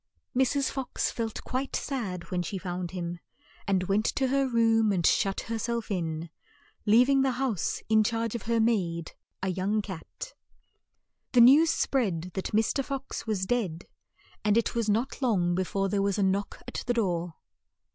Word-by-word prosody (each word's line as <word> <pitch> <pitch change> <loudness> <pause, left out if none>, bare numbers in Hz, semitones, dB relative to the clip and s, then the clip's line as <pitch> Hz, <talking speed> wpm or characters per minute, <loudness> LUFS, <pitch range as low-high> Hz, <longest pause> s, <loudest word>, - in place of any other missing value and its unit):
Mrs. 265 +2 +2
Fox 265 -2 -2
felt 225 -2 -4
quite 260 +2 -3
sad 195 -11 -4
when 180 -1 0
she 190 +3 -4
found 180 -1 -4
him, 175 -1 -5 0.5
and 190 -2 +2
went 200 +4 +1
to 265 -1 +1
her 275 0 +2
room 225 -3 +3
and 175 -4 0
shut 195 -1 +2
her 225 0 -4
self 235 -1 -2
in, 165 -3 -3 0.6
leav 235 +4 +6
ing 275 -1 +4
the 265 -1 +2
house 245 -7 -1
in 220 0 +4
charge 230 0 -1
of 235 - -3
her 230 -1 +3
maid, 180 -8 0 0.3
a 190 - 0
young 190 +4 0
cat. 200 - -7 1.0
The 245 - +7
news 285 +7 +7
spread 185 - 0
that 190 - -3
Mr. 225 +6 +1
Fox 275 -3 -5
was 200 -4 0
dead, 190 -7 -1 0.6
and 210 0 +3
it 230 - +1
was 230 -2 0
not 235 +7 0
long 190 -9 +2
be 185 +2 +1
fore 195 +2 -1
there 200 0 0
was 200 0 0
a 205 - +2
knock 195 +1 -1
at - - -4
the 245 - +1
door. 175 -6 -1
215 Hz, 175 wpm, -28 LUFS, 185-240 Hz, 1.0 s, The